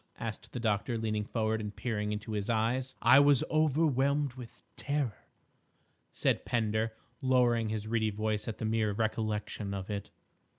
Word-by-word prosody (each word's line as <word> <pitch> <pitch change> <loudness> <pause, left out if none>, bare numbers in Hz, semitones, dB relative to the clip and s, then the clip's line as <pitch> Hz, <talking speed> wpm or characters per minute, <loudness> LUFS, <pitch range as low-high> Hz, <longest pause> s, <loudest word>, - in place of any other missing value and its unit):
asked - - -6
the - - -4
doctor, 115 +1 0
leaning 110 -1 -1
forward 110 0 -1
and 105 -1 -6
peering 105 -4 -2
into 105 +1 -4
his 105 +1 -2
eyes. 120 +4 0
"—I 135 - +8
was 145 -2 +5
overwhelmed 145 -3 +2
with 125 -3 -11
terror," 140 -6 -2 0.8
said - - +1
Pender, 110 -1 0 0.3
lowering 120 -3 +3
his 110 0 -3
reedy 110 -1 +1
voice 105 0 -2
at 115 - -4
the - - -3
mere 110 -1 +1
recollection 105 -2 -2
of 95 +1 -5
it. 100 -1 -4
110 Hz, 155 wpm, -31 LUFS, 105-125 Hz, 0.8 s, I